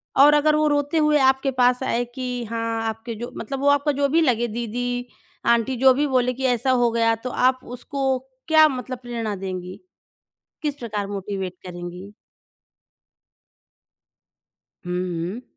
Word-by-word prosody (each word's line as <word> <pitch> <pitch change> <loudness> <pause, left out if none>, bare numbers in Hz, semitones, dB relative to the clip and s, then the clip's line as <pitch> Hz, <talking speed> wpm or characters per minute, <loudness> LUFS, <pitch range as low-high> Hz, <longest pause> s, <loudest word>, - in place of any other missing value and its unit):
और 290 +2 +7
अगर 300 +1 +4
वो 305 0 +2
रोते 290 +2 +1
हुए 300 -1 +4
आपके 265 +1 +3
पास 250 0 +2
आए 245 -2 0
कि 250 -2 -3
हाँ, 230 0 -2
आपके 225 +1 -6
जो 240 +3 -6
मतलब 275 -1 -5
वो 285 - 0
आपका 285 +1 +3
जो 285 0 +1
भी 330 +3 +3
लगे 240 -5 +2
दीदी, 245 +2 -3 0.4
आंटी 235 +2 +2
जो 260 +1 +6
भी 290 +3 0
बोले 250 -2 +1
कि 265 +2 -4
ऐसा 245 +1 +1
हो 245 -2 +3
गया, 230 0 +2
तो 235 +3 -6
आप 255 +1 +2
उसको 265 +2 -2 0.3
क्या 315 -1 +7
मतलब 255 -2 -4
प्रेरणा 230 -4 -4
देंगी, 185 -1 -6 0.8
किस 295 -2 -2
प्रकार 210 -6 -4
मोटिवेट 195 -2 -4
करेंगी? 180 +3 -8 2.7
हुँ, 180 - -3
हुँ। 180 +4 -3
245 Hz, 155 wpm, -23 LUFS, 225-270 Hz, 2.7 s, और